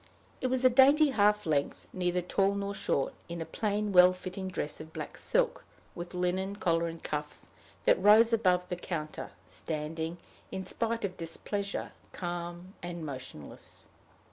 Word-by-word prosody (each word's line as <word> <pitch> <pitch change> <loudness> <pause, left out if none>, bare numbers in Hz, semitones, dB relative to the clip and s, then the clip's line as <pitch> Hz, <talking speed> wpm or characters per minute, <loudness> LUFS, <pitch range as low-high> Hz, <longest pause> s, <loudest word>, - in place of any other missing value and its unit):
It 255 - +1
was 255 0 +1
a - - +9
dainty 280 +4 +6
half 210 -3 +3
length, 145 -3 0
neither 180 -1 0
tall 195 +3 +1
nor 200 0 -2
short, 140 -8 -1 0.2
in 170 0 -5
a 165 - -3
plain, 210 +4 -1
well 180 -1 +8
fitting 185 +1 -6
dress 165 -5 -4
of 160 0 -11
black - - -6
silk, - - 0 0.3
with 175 +1 -7
linen 185 +2 -1
collar 170 -4 +1
and 165 0 -7
cuffs, 150 0 -4 0.4
that - - +4
rose 220 +3 +7
above 180 -5 +3
the 180 - -2
counter, 155 -3 -5 0.2
standing, 160 +2 -4 0.3
in 190 0 -4
spite 230 +3 -1
of 185 -2 -5
displeasure, 200 +4 -3 0.2
calm 175 +1 -5
and 175 -2 -5
motionless. 130 - -9
180 Hz, 155 wpm, -30 LUFS, 165-205 Hz, 0.4 s, a